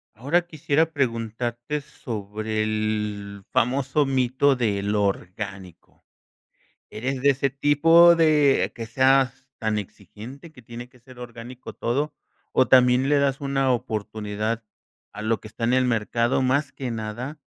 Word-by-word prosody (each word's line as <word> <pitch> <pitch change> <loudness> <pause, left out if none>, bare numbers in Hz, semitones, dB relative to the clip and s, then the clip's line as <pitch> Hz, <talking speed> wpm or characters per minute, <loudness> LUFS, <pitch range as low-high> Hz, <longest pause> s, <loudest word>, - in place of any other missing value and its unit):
Ahora 145 +10 +1
quisiera 155 0 0
preguntarte 120 0 -2
sobre 110 -3 -4
el 105 -2 -3
famoso 135 +4 +1
mito 135 +1 +2
de 105 -5 0
lo 105 0 +1
orgánico, 95 -2 -5 0.9
¿eres 130 +4 -4
de 140 - +4
ese 135 +1 0
tipo 165 +5 +6
de 150 -4 +3
que 115 - -6
seas 130 +1 +2
tan 110 -2 -1
exigente, 110 - -9
que 130 - -16
tiene 120 +2 -9
que 125 - -22
ser 125 0 -16
orgánico 120 +1 -9
todo, 140 +6 -2 0.4
o 130 - +3
también 125 +1 +5
le 145 - +4
das 140 -1 0
una 135 -1 +1
oportunidad 110 -1 -3 0.5
a - - -7
lo 110 +1 0
que - - -11
está 115 +2 -4
en 120 - +2
el 130 0 +3
mercado, 115 +1 0
más 135 +2 +1
que 130 -3 -5
nada 115 +6 -5
125 Hz, 140 wpm, -24 LUFS, 110-135 Hz, 0.9 s, tipo